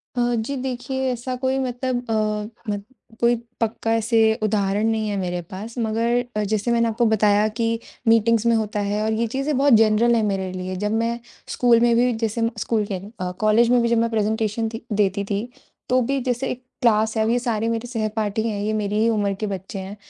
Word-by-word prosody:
अ, - - -1 0.2
जी 235 +5 -2
देखिए 265 0 -2
ऐसा 250 +1 -4
कोई 260 +1 +1
मतलब 250 -1 -2
अ, - - +1 0.6
म 205 -1 -2 0.4
कोई 240 0 +4 0.3
पक्का 225 0 -1
ऐसे 230 +1 +1 0.3
उदाहरण 205 0 +1
नहीं 220 -1 0
है 205 - -2
मेरे 180 -1 -2
पास। 215 +6 -7
मगर 230 +2 +1 0.2
अ, 210 - +1
जैसे 215 +3 0
मैंने 235 0 +3
आपको 230 +1 +1
बताया 210 0 +3
कि 230 0 +1 0.3
मीटिंग्स 225 0 +4
में 235 -1 +4
होता 215 -1 -1
है 205 +1 -1
और 220 0 0
ये 230 +1 0
चीज़ें 275 +5 -1
बहुत 275 -1 +4
जनरल 225 +2 +5
है 230 - +2
मेरे 195 -2 -1
लिए। 185 0 -5
जब 210 +3 -2
मैं 230 +1 0 0.3
स्कूल 240 -2 +3
में 235 0 +4
भी 245 +1 +3
जैसे 225 0 -2
मैं 230 0 +1
स्कूल 215 0 0
कह 200 - -3
रही 180 - -10
हूँ 215 - -13
अ, 180 0 -2
कॉलेज 215 +2 +4
में 245 -1 +4
भी 235 - +2
जब 235 - +3
मैं 230 0 +2
प्रेज़न्टैशन 220 0 0
थी 225 - -7
देती 200 -1 +1
थी, 205 +4 -3 0.4
तो 255 0 +3
भी 270 +3 0
जैसे 250 +1 -1
एक 250 - -7 0.2
क्लास 220 -1 +3
है 220 - +3
अब 220 - 0
ये 240 - +3
सारे 230 -2 -1
मेरे 230 +1 -2
सहपाठी 220 -2 -2
हैं, 210 -2 -2
ये 215 +1 -1
मेरी 210 -1 -1
ही 225 - +3
उम्र 205 -3 +1
के 215 - -2
बच्चे 195 0 -5
हैं। 190 +2 -7
225 Hz, 225 wpm, -22 LUFS, 210-235 Hz, 0.6 s, जनरल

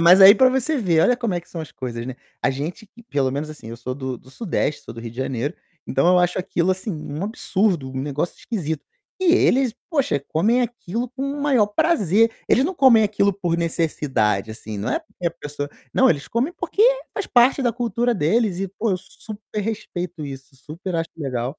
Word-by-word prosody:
Mas 175 +3 +7
aí 195 +2 +11
para 260 +4 +6
você 265 +4 0
ver, 175 -7 +2
olha 250 - +4
como 230 -6 -1
é 175 - -1
que - - -24
são 170 - -5
as 155 - -8
coisas, 120 -2 -5
né, 130 - -5 0.3
a - - +3
gente 150 +10 -5
que 230 +4 -18
pelo 140 - 0
menos 150 +3 -3
assim, 150 -7 -10
eu 115 - -7
sou 125 +2 -5
do 130 -1 -4
do 130 - -18
sudeste, 155 - -2
sou - - -9
do 115 - -8
Rio 115 0 -6
de 115 - -16
Janeiro, 130 +1 -2 0.3
então 135 +5 +1
eu 180 0 +6
acho 180 0 +2
aquilo 180 0 0
assim 190 +2 -2
um 150 +2 -5
absurdo, 190 -8 0
um 130 - -4
negócio 145 +4 -2
esquisito. 160 -9 -3 0.3
E 370 -3 +4
eles, 265 - +3 0.2
poxa, 270 - +1
comem 220 +10 +2
aquilo 240 -1 -3
com 265 +1 -6
o 280 +1 -3
maior 260 -8 +4
prazer, 225 - +3 0.2
eles 260 - +4
não 375 - -3
comem 260 -8 +6
aquilo 200 -1 +2
por 175 -3 -1
necessidade 140 - 0
assim, 110 -1 -7
não 100 - -2
é - - +1
porque 250 - -7
a - - +2
pessoa, 145 -3 -6 0.2
não, 265 - +5 0.2
comem 255 +9 0
porque 405 - -1 0.3
faz 405 - -3
parte 255 +3 +4
da 240 - +2
cultura 240 +1 0
deles 195 +2 +1
e 195 - -2
pô, 205 +3 -2
eu 185 - +1
super 210 +2 -8
respeito 180 -6 -4
isso, 135 -1 -9
super 160 +7 -7
acho 165 0 -1
legal, 130 -2 -3
180 Hz, 215 wpm, -22 LUFS, 145-235 Hz, 0.3 s, aí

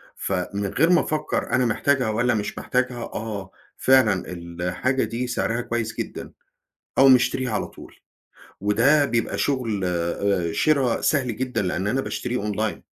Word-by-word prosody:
فمن 100 +2 -2
غير 155 - +2
ما 175 - +5
أفكّر 155 0 -2
أنا 130 -1 +3
محتاجها 125 +1 +1
والّا 120 +3 +1
مش 105 -2 -3
محتاجها، 125 -1 -1
آه 105 -4 -6 0.3
فعلًا 120 -8 +4
الحاجة 90 +9 -2
دي 115 +3 -3
سعرها 120 -1 -1
كويّس 115 -1 -3
جدًا، - - -5 0.7
أقوم 135 -1 +8
مشتريها 125 0 +1
على - - -1
طول، - - -14 0.6
وده 120 +9 +4
بيبقى 120 -4 -1
شغل 115 -8 -1
آآ 85 0 0
شرا 135 - +2
سهل 130 -7 +1
جدًا 125 -3 -1
لأن 90 +1 -2
أنا 130 +6 +1
باشتريه 120 -5 -3
online. 110 +1 -2
115 Hz, 145 wpm, -23 LUFS, 100-130 Hz, 0.7 s, أقوم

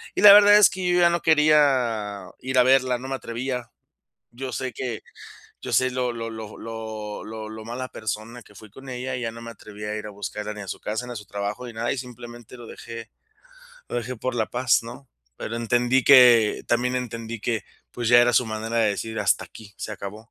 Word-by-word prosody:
Y - - -1
la 205 -1 +11
verdad 205 0 +8
es 210 - +7
que 185 -3 -4
yo 175 0 +3
ya 170 - +6
no 170 -1 0
quería 130 - +2
ir 130 0 0
a - - +7
verla, 130 -1 +3
no 130 - -8
me 135 - -1
atrevía. 125 0 -5 0.6
Yo 130 +2 -6
sé 130 +2 -4
que 120 -1 -5 0.6
yo - - -6
sé 130 0 +3
lo 125 -1 -1
lo 115 -1 -5
lo 110 -1 -9 0.7
lo 110 0 -7
lo 110 0 -9
mala 125 +3 -5
persona 110 +3 -6
que 105 - -20
fui 110 +2 -13
con 135 +6 -13
ella, 125 +1 -4
y 125 - -5
ya 115 - -2
no 115 0 -10
me 115 0 -8
atreví 105 -1 -11
a 105 0 -3
ir 105 0 -6
a - - -7
buscarla 105 +1 -6
ni 105 - -9
a 95 - -10
su - - -6
casa, 110 +4 -4
ni 125 - -7
a - - -8
su 105 - -7
trabajo, 105 +5 -4
ni 120 - -8
nada, 115 +2 -1
y 135 - -4
simplemente 120 -1 -10
lo 120 - -10
dejé 115 0 -9 0.8
lo - - -4
dejé 120 +2 -4
por 130 +3 -3
la 110 -2 0
paz, 125 0 +2
¿no? 120 +3 -11 0.3
Pero 115 - -5
entendí 120 +2 +2
que 125 -5 +6
también 125 +1 +1
entendí 115 -2 -5
que, 110 -2 -2 0.3
pues, 120 -2 -3
ya 120 0 +7
era 120 0 +3
su 120 +1 +3
manera 110 +1 -4
de 110 -2 +3
decir: 110 +2 -4
hasta 100 - +1
aquí, 105 -3 -14
se 110 - -6
acabó. 105 +3 -9
120 Hz, 230 wpm, -24 LUFS, 110-130 Hz, 0.8 s, la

